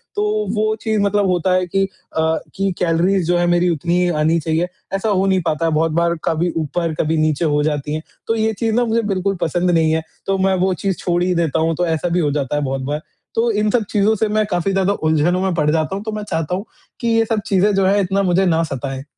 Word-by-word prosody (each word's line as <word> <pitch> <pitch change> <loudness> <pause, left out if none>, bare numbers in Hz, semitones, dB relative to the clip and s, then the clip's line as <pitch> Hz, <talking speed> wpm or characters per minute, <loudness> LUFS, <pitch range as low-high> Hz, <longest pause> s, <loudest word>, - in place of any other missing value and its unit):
तो 210 0 0
वो 215 +1 +1
चीज़ 220 -2 0
मतलब 200 0 +2
होता 180 0 +1
है 185 0 +2
कि 195 +2 +1 0.3
अ, 160 0 +2 0.2
कि 195 0 0
कैलोरीज़ 175 +2 +2
जो 175 0 +2
है 175 - +2
मेरी 175 +1 +3
उतनी 170 +2 0
ही 180 - +2
आनी 160 +2 +2
चाहिए। 160 +2 0 0.3
ऐसा 195 +3 0
हो 195 -2 +2
नहीं 190 -1 +2
पाता 160 0 0
है 165 - +1
बहुत 160 +1 +1
बार 170 +1 +1
कभी 165 +2 0
ऊपर 165 +1 -1
कभी 160 +1 +1
नीचे 155 +1 +1
हो 150 -1 +2
जाती 150 -1 -2
है। 155 - -3 0.3
तो 225 - +1
ये 220 0 +1
चीज़ 225 -1 0
ना 245 0 +2
मुझे 230 +1 +1
बिल्कुल 195 +1 -1
पसंद 175 +2 +1
नहीं 160 -2 +3
है 160 0 +1 0.2
तो 195 0 0
मैं 190 -1 +3
वो 190 - +1
चीज़ 190 +2 -2
छोड़ 175 -1 -1
ही 180 - +1
देता 165 -2 0
हूँ, 165 +1 +1
तो 175 +3 0
ऐसा 165 +1 -1
भी 175 +1 +1
हो 150 -4 +1
जाता 145 -1 -2
है 150 - 0
बहुत 135 -1 -2
बार। 145 +3 -3 0.3
तो 230 +1 +2
इन 210 0 +1
सब 240 -1 +2
चीज़ 205 -1 +1
से 220 - +2
मैं 215 0 +1
काफ़ी 180 +2 0
ज़्यादा 195 +1 +1
उलझनों 160 +2 +1
में 190 -1 0
पड़ 150 -2 +1
जाता 160 +3 0
हूँ 200 - -5
तो 220 - -4
मैं 210 -1 -4
चाहता 165 +2 -1
हूँ 195 - -5 0.3
कि 235 - -2
ये 225 0 +3
सब 220 -1 -1
चीज़ें 200 +1 +3
जो 195 -1 +2
हैं 200 +2 +3
इतना 195 +1 0
मुझे 185 +1 +2
ना 165 -2 +2
सताएँ। 135 -3 -4
180 Hz, 260 wpm, -19 LUFS, 160-200 Hz, 0.3 s, मेरी